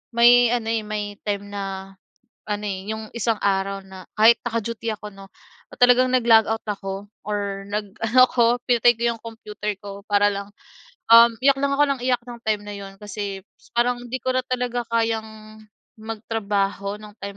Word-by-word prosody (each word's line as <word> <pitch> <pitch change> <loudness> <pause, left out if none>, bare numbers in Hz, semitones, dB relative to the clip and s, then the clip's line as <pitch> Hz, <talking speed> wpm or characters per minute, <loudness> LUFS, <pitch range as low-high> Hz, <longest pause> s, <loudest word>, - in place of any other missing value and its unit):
may 240 +1 +7
ano, 230 -2 -1
eh, 225 - 0
may 210 -1 -5
time 205 0 -3
na, 195 -1 -5 0.6
ano, 210 0 -2
eh, 195 0 -4
yung 220 0 -6
isang 230 -1 0
araw 195 0 0
na 190 -1 -12
kahit 225 +2 +7
naka-duty 230 0 -3
ako 210 0 -8
'no, 195 0 -13 0.4
or - - -11
talagang 250 +1 +5
nag-log 230 -3 +5
out 225 0 -2
ako 195 0 -5 0.2
or 200 -1 -3
nag-ano 210 +4 0
ako, 240 0 +2
pinatay 240 0 +5
ko - - -5
yung 225 - -21
kompiuter 210 -3 -6
ko 200 -1 -9
para 205 -1 +3
lang, 200 0 -4 0.6
um, 230 +1 +9
iyak 275 +1 +4
lang 280 0 0
ako 290 +1 +4
ng - - -14
iyak 250 -1 +1
nung 235 -1 -9
time 215 -1 0
na 205 - -6
'yon 195 -1 -10
kasi, 205 -1 -5 0.3
parang 245 +1 +2
'di 260 - -2
ko 255 0 -1
na 255 - +1
talaga 250 -1 -2
kayang 220 -1 -2 0.4
magtrabaho 205 -2 -2
nung 210 0 -12
time 200 0 -7
215 Hz, 175 wpm, -23 LUFS, 200-235 Hz, 0.6 s, um